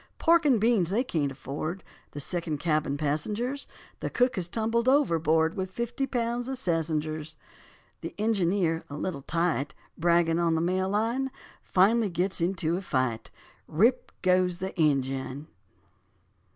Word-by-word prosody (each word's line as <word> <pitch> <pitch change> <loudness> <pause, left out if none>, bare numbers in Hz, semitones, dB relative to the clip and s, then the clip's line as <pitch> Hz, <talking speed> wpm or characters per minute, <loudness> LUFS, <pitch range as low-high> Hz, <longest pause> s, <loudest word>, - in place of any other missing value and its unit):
Pork 335 -1 +4
and 255 -6 +4
beans 215 -6 +3
they 220 +6 +1
can't 150 - -1
afford, 155 +7 -5 0.3
The 145 - -8
second 165 0 -2
cabin 150 -2 0
passengers; 210 - -2 0.3
The - - -3
cook 250 +1 +2
has 180 -3 -1
tumbled 230 +5 +1
overboard 165 - +3
With 190 -2 -3
fifty 235 +6 -3
pounds 240 -1 -1
of 265 0 -3
sassengers; 155 -5 -2 0.6
The - - -6
engineer, 190 -6 +1
a 145 - -6
little 150 -3 -3
tight, 160 -2 0 0.2
Bragging 170 0 +3
on 165 -1 +2
the - - +1
Mail 185 +2 0
Line, 230 +6 0 0.3
Finally 210 +4 +3
gets 180 +2 -1
into 170 -1 0
a - - -4
fight, 130 -9 -1 0.4
Rip, 230 +11 +2
goes 180 -1 +3
the 190 +1 -5
engine. 135 -2 0
175 Hz, 140 wpm, -28 LUFS, 155-225 Hz, 0.6 s, Pork